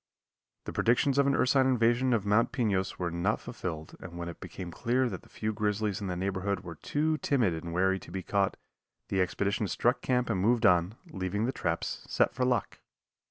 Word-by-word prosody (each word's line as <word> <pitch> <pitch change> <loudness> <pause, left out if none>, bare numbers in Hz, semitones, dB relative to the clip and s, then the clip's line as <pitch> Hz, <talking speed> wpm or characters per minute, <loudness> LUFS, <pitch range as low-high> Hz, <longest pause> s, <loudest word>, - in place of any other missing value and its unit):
The - - -5
predictions 130 +4 +2
of 140 - +4
an 140 - +3
ursine 130 +1 +3
invasion 125 0 +3
of 110 -4 +1
Mount 105 +3 +3
Pinos 100 -6 0
were 90 -2 -2
not 90 +6 0
fulfilled 80 -9 -6
and 85 0 -9
when 85 0 -4
it 85 - -9
became 90 0 -7
clear 125 +6 +1
that 95 -7 -5
the - - -20
few 110 0 -3
grizzlies 105 -1 -1
in 100 - -3
the 90 - -2
neighborhood 95 +1 -1
were 85 -2 -7
too 155 - -1
timid 120 - +2
and 80 +1 -5
wary 95 +2 +2
to - - -13
be 95 +1 -5
caught, 100 +2 0 0.5
the 95 - +1
expedition 100 +3 0
struck 120 +5 +1
camp 125 -1 +1
and 95 -4 0
moved 115 +3 +3
on, 90 +1 +4 0.2
leaving 95 +3 -2
the 130 - 0
traps - - -3
set - - +2
for 130 - -1
luck. 125 -2 0
100 Hz, 205 wpm, -30 LUFS, 90-120 Hz, 0.5 s, of